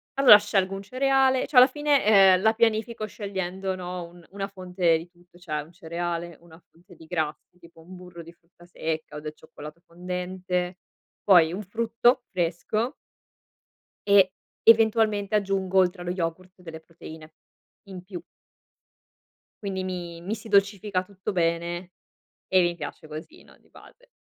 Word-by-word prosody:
allora 270 -6 +9
scelgo 195 -2 -1
un 195 - -6
cereale, 265 +2 +2
cioè 285 - -11
alla 250 +1 +10
fine, 295 +1 +1
ehm, 195 -3 +6
la 220 +1 +3
pianifico 225 0 0
scegliendo, 190 -2 -4
no, 180 -1 -6
un 175 -1 -17
una 195 0 -4
fonte 180 -3 0
di 165 +2 -10
tutto. 175 0 -24
Cioè 155 -4 -4
un 155 +3 -14
cereale, 170 -1 -5
una 165 0 -17
fonte 175 +2 -20
di 160 - -15
grassi, 160 +1 -4
tipo 170 -1 -18
un 185 +3 -13
burro 180 -1 -11
di 170 +1 -13
frutta 175 0 -23
secca, 160 -3 -5
o - - -5
del 150 0 -7
cioccolato 155 +1 -12
fondente 180 +1 -4 0.5
poi 170 -3 +6
un 200 - -4
frutto 230 +4 +1
fresco 190 - -2 1.1
e, 195 -2 +5 0.3
eventualmente, 220 -2 +4
aggiungo, 190 -2 +1
oltre 180 0 +1
allo 175 0 -3
yogurt, 180 +1 -5
delle 160 -2 -9
proteine 160 -1 -13 0.5
in 185 -2 -9
più. 180 -3 -8 1.4
Quindi 190 -1 -3
mi 175 -2 -6
mi 205 +6 -3
si 225 - -12
dolcifica 200 -2 +1
tutto 195 0 -6
bene, 170 +1 -1 0.6
e 185 -1 +4
mi 175 0 0
piace 155 -2 -8
così 155 - -10
no, - - -20
di - - -30
base. - - -18
185 Hz, 155 wpm, -25 LUFS, 170-205 Hz, 1.4 s, alla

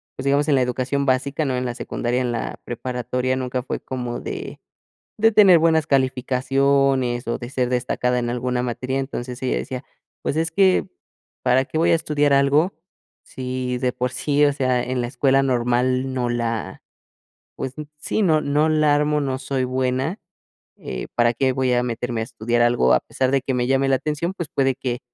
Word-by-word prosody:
pues 130 - -7
digamos, 140 +2 +2
en 150 - +3
la 130 - +3
educación 130 +3 -1
básica, 135 +4 +1
¿no? 130 -2 -1
En 125 - -2
la 120 - -2
secundaria, 120 0 -2
en 125 -1 -1
la 115 - -4
preparatoria, 125 +1 -2
nunca 125 -1 -3
fue - - -4
como 125 -2 -5
de - - -6 0.6
de 225 +1 +4
tener 195 -5 +7
buenas 160 -1 +2
calificaciones 135 -1 +1
o 115 - -2
de 120 0 -7
ser 130 -2 0
destacada 125 0 0
en 120 0 -2
alguna 125 0 -1
materia, 130 +2 -2
entonces 125 -2 -6
ella 130 - 0
decía: 130 0 -4 0.4
"Pues - - -2
es 160 +1 0
que, 190 +1 +3 0.5
¿para 130 +1 +3
qué 155 - -4
voy 165 - +3
a - - +5
estudiar 145 -2 +1
algo? 140 +6 +3 0.5
Si 125 -1 -4
de 125 0 0
por 125 +1 -2
sí, 145 +1 +2
o 145 - +3
sea, 130 -3 +1
en 125 0 -2
la 120 - -2
escuela 135 +1 +2
normal 125 +1 +1
no 125 -2 -1
la, 115 -4 -3 0.7
pues 130 0 -5 0.2
sí, 215 - -1
no 160 -5 +3
no 150 +2 +1
la 155 -1 +3
armo, 150 0 +1
no 135 -2 -2
soy 135 -1 -2
buena, 130 +7 -1 0.6
eh, 60 -1 -6
para 120 0 +3
qué 130 +2 +1
voy 130 -1 +1
a 120 - +2
meterme 120 -1 -2
a - - -2
estudiar 115 +1 -1
algo, 120 - +4
a - - +3
pesar 130 -1 -1
de 135 -1 +1
que 135 - -2
me 125 -1 0
llame 135 +1 +2
la 135 - +4
atención, 150 +6 -2
pues 170 -6 -5
puede 135 -1 +1
que 125 -2 -3
130 Hz, 195 wpm, -22 LUFS, 125-140 Hz, 0.7 s, tener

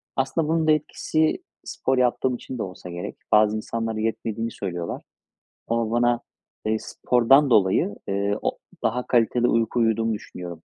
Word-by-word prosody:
Aslında 135 +4 0
bunun 160 0 +1
da - - +6
etkisi 155 +1 0 0.2
spor 130 0 -1
yaptığım 125 0 +2
için 125 +1 -7
de - - -2
olsa 90 -1 -8
gerek. 85 +1 -6
Bazı 105 0 +5
insanlar 115 0 -3
yetmediğini 115 +1 -2
söylüyorlar. 90 -3 -4 0.7
Ama 115 -1 0
bana, 120 0 +2 0.5
ııı, 110 - +2
spordan 130 +3 +3
dolayı, 100 -1 +3
ııı, 100 +1 0
o - - -1 0.2
daha 125 +1 0
kaliteli 120 0 +3
uyku 115 +1 +1
uyuduğumu 115 0 +2
düşünüyorum. 85 -5 -8
115 Hz, 145 wpm, -24 LUFS, 105-125 Hz, 0.7 s, da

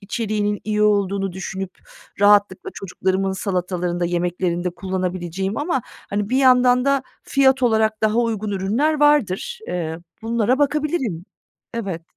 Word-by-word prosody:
içeriğinin 210 0 -2
iyi 210 0 0
olduğunu 200 -2 +1
düşünüp 190 0 -6 0.4
rahatlıkla 205 -2 +4
çocuklarımın 190 0 -1
salatalarında, 180 -2 -2
yemeklerinde 175 0 -1
kullanabileceğim 185 +1 -3
ama, 290 -5 -1 0.3
hani, 205 0 -1
bir 255 - +1
yandan 250 -1 +5
da 275 -1 +2 0.2
fiyat 265 -1 +3
olarak 220 -2 +2
daha 215 +2 +2
uygun 220 -3 0
ürünler 225 +11 0
vardır. 295 - +2
Iıı, 165 -1 -3 0.2
bunlara 235 +3 +1
bakabilirim. 285 - 0 0.5
Evet. 190 -8 -4
205 Hz, 120 wpm, -21 LUFS, 185-245 Hz, 0.5 s, yandan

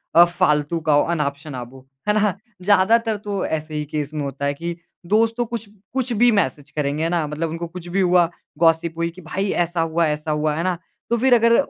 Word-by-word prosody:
अ, 170 - +10
फ़ालतू 165 -2 +1
का 155 -2 +1
हो 145 - +5
अनाप-शनाप 140 -5 -3
हो। 130 0 -15 0.2
है 210 - +4
ना? 210 -2 +2 0.3
ज़्यादातर 210 +4 +3
तो 205 -1 -3
ऐसे 155 0 -3
ही 150 - -1
केस 150 0 -4
में 150 -1 -2
होता 140 0 -4
है 140 - +1
कि, 170 +4 -4 0.3
दोस्त 220 +5 +3
तो 240 - +1
कुछ, 230 -2 -5 0.3
कुछ 260 -1 -1
भी 240 +2 +5
मैसेज़ 145 - 0
करेंगे 150 +1 -1
है 165 - +1
ना? 170 -2 +1
मतलब 155 +2 -3
उनको 165 +2 -4
कुछ 175 +1 -9
भी 190 +3 0
हुआ, 175 -2 +4 0.3
गॉसिप 165 0 +3
हुई 170 0 0
कि 175 +2 -13
भाई 190 +5 -2
ऐसा 175 0 0
हुआ 165 +1 +1
ऐसा 150 +1 -2
हुआ 150 0 0
है 165 - -1
ना? 185 -1 0 0.3
तो 235 - +2
फिर 255 +2 +4
अगर, 230 0 +5
170 Hz, 225 wpm, -22 LUFS, 150-200 Hz, 0.3 s, अ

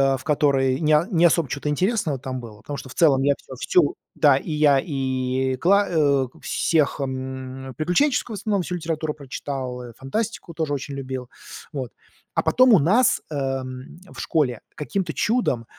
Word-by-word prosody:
э, - - -3
в 130 - -12
которой 140 -3 +2
не 155 -1 +4
не 170 -2 +4
особо 165 -2 +3
чё-то 140 +3 -3
интересного 180 - 0
там 130 0 -5
было, 110 -3 -10
потому 140 +6 -7
что 135 -1 -9
в - - -9
целом 140 -5 +4
я 140 +1 +4
всё, 130 - -11
всю 150 +4 +2 0.2
да, 145 -3 +5
и 160 - -5
я 150 -2 +4
и 130 -2 -1
кла 200 +8 +3
э, 140 -5 +2
всех, 155 -4 +1
м, 130 0 -5
приключенческую, 215 - +1
в - - -5
основном, 205 -4 0
всю 180 - -4
литературу 160 -2 -2
прочитал, 135 -3 -5
э, 120 -1 -9
фантастику 185 +6 -4
тоже 155 -2 -2
очень 140 0 -4
любил. 130 -2 -5 0.4
Вот. 130 -6 -5 0.4
А - - +1
потом 255 -2 +5
у 200 - +7
нас, 210 - +3
э, - - -4 0.7
в - - -11
школе 130 -8 0 0.2
каким-то 160 +4 -3
чудом, 210 - 0
145 Hz, 175 wpm, -23 LUFS, 130-170 Hz, 0.7 s, у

